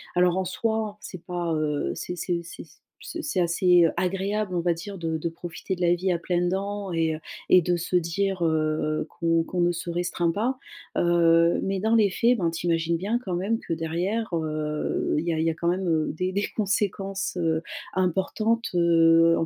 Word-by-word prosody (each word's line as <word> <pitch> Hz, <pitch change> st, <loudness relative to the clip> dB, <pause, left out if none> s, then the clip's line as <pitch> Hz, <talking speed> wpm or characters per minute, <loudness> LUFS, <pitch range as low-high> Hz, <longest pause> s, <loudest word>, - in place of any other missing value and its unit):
Alors 180 Hz, 0 st, +3 dB
en 190 Hz, -, 0 dB
soi, 215 Hz, +2 st, -2 dB
c'est 185 Hz, -, -9 dB
pas, 175 Hz, -2 st, -2 dB
heu, 150 Hz, -2 st, -1 dB
c'est 180 Hz, -, -5 dB
c'est, 180 Hz, -, -4 dB
heu 170 Hz, -, -3 dB
c'est 170 Hz, -, -9 dB
s 160 Hz, 0 st, -22 dB, 0.2 s
ce 335 Hz, -, -6 dB
c'est 295 Hz, -12 st, -2 dB
assez 175 Hz, 0 st, +4 dB
agréable, 195 Hz, +2 st, -1 dB
on 175 Hz, -, +1 dB
va 175 Hz, 0 st, +2 dB
dire, 195 Hz, +4 st, -7 dB
de 165 Hz, -2 st, -2 dB
de 170 Hz, +2 st, -2 dB
profiter 175 Hz, +3 st, -5 dB
de 180 Hz, -, -9 dB
la 175 Hz, 0 st, +4 dB
vie 185 Hz, +2 st, 0 dB
à 175 Hz, -, +1 dB
pleines 175 Hz, +1 st, 0 dB
dents 200 Hz, +1 st, -3 dB
et, 165 Hz, -1 st, +1 dB
heu 155 Hz, -, -8 dB, 0.3 s
et 185 Hz, -, +7 dB
de 175 Hz, +1 st, +1 dB
se 175 Hz, +1 st, -2 dB
dire, 180 Hz, +2 st, -1 dB
heu, 155 Hz, -1 st, 0 dB
qu'on 165 Hz, -1 st, +1 dB
qu'on 180 Hz, +2 st, -4 dB
ne 175 Hz, 0 st, +3 dB
se 175 Hz, +1 st, -5 dB
restreint 175 Hz, 0 st, 0 dB
pas. 235 Hz, +8 st, -1 dB, 0.4 s
Heu, 170 Hz, -1 st, +4 dB
mais 195 Hz, 0 st, -1 dB
dans 220 Hz, +3 st, +1 dB
les 215 Hz, -3 st, +5 dB
faits, 235 Hz, +6 st, +2 dB
ben, 170 Hz, -3 st, +1 dB
tu 165 Hz, +1 st, -5 dB
imagines 165 Hz, 0 st, +1 dB
bien 210 Hz, +7 st, -1 dB
quand 185 Hz, -5 st, -2 dB
même 205 Hz, +6 st, 0 dB
que 170 Hz, -, -4 dB
derrière, 175 Hz, +7 st, -2 dB
heu, 155 Hz, -2 st, -1 dB
il 165 Hz, -, -3 dB
y 170 Hz, -, 0 dB
a -, -, -2 dB
il 160 Hz, -, +1 dB
y -, -, +3 dB
a -, -, -4 dB
quand 170 Hz, +1 st, -3 dB
même 170 Hz, -3 st, +1 dB
des 185 Hz, +4 st, -2 dB
des 200 Hz, +2 st, -1 dB
conséquences, 195 Hz, -2 st, -1 dB
heu, 160 Hz, -1 st, +1 dB, 0.3 s
importantes, 195 Hz, +5 st, 0 dB
heu, 165 Hz, -1 st, +5 dB
en -, -, 0 dB
175 Hz, 215 wpm, -25 LUFS, 165-195 Hz, 0.4 s, et